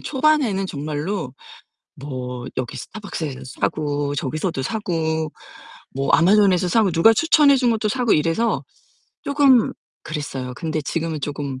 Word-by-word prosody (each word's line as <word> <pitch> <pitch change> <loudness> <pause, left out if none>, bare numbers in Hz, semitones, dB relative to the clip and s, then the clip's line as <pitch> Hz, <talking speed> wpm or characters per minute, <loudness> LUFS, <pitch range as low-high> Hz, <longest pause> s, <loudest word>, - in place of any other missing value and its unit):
초반에는 270 -9 +1
정말로 150 0 -4 0.6
뭐 125 -3 -6
여기 125 -2 -3
스타벅스에서 170 -10 -6 0.2
사고, 145 -1 -1
저기서도 150 +2 -2
사고, 160 -3 -2 0.6
뭐 135 +1 -1
아마존에서 185 0 +4
사고, 215 0 +3
누가 170 +7 +5
추천해 295 0 +5
준 250 -2 +2
것도 220 -1 0
사고 245 -1 +1
이래서 165 +10 0 0.6
쪼금 280 -4 +4 0.3
그랬어요. 135 -4 -5
근데 160 -1 -2
지금은 160 +1 -3
쪼금 140 -2 -4
165 Hz, 300 characters per minute, -21 LUFS, 145-220 Hz, 0.6 s, 누가